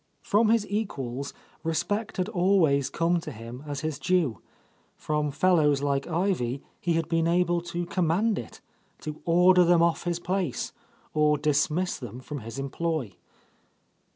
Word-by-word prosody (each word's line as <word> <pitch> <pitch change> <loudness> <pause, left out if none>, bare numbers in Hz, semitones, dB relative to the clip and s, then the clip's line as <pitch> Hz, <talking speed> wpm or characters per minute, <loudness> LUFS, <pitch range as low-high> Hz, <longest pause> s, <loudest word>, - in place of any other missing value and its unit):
From 215 +2 +3
his 225 -2 +3
equals, 140 - -3 0.3
respect 205 +7 -1
had 185 0 0
always 175 - +3
come 170 +3 +1
to 155 - -7
him 115 +3 -9
as 145 -1 -4
his 155 -3 -3
due; 175 - +1 0.6
from 150 -1 -1
fellows 150 -3 +3
like 140 -1 0
Ivy 160 -7 -1 0.2
he 170 - 0
had 165 0 0
been 165 -1 +1
able 175 0 +2
to 175 0 -4
command 185 +5 +1
it, 115 - -10 0.2
— - - -35
to 155 0 -6
order 180 +2 +6
them 170 -1 +5
off 170 +1 +1
his 175 -1 0
place, 180 -5 -2 0.4
or 150 -1 +3
dismiss 150 +4 +1
them 125 -2 -7
from 145 +3 -6
his 115 +2 -8
employ. 140 - -2
165 Hz, 155 wpm, -27 LUFS, 140-180 Hz, 0.6 s, order